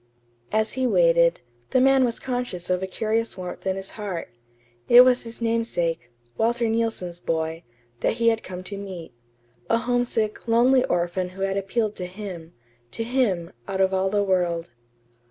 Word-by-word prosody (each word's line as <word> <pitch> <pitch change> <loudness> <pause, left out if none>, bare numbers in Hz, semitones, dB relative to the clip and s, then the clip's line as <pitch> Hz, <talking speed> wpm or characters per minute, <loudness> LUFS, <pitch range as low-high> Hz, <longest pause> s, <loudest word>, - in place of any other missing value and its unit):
As 220 0 +1
he 260 0 0
waited, - - +4 0.3
the 255 - +3
man 270 0 +5
was 235 -2 0
conscious 245 -9 -3
of 180 0 +1
a 190 - -2
curious 220 +3 -1
warmth 180 +1 -6
at 190 - +1
his 195 0 -5
heart. 200 -6 -5 0.6
It 240 +1 +10
was 250 -1 +3
his 230 0 -6
namesake, 175 - -1 0.3
Walter 235 +1 +2
Neilson's 225 -6 -1
boy, 160 -1 -2 0.4
that - - +1
he 230 0 +3
had 225 0 0
come 185 0 -8
to 200 +2 -5
meet; 185 -8 -8 0.6
a 230 - +4
homesick, 240 -2 -1
lonely 250 +3 +4
orphan 175 +1 -1
who 195 +1 -6
had 195 0 0
appealed 205 +2 -1
to 180 - -4
him 180 -4 -8 0.4
to 225 - -3
him, 225 -9 0 0.2
out 190 - -3
of 190 0 +3
all 190 0 +1
the 205 +1 +1
world. 175 -5 0
205 Hz, 170 wpm, -24 LUFS, 180-235 Hz, 0.6 s, It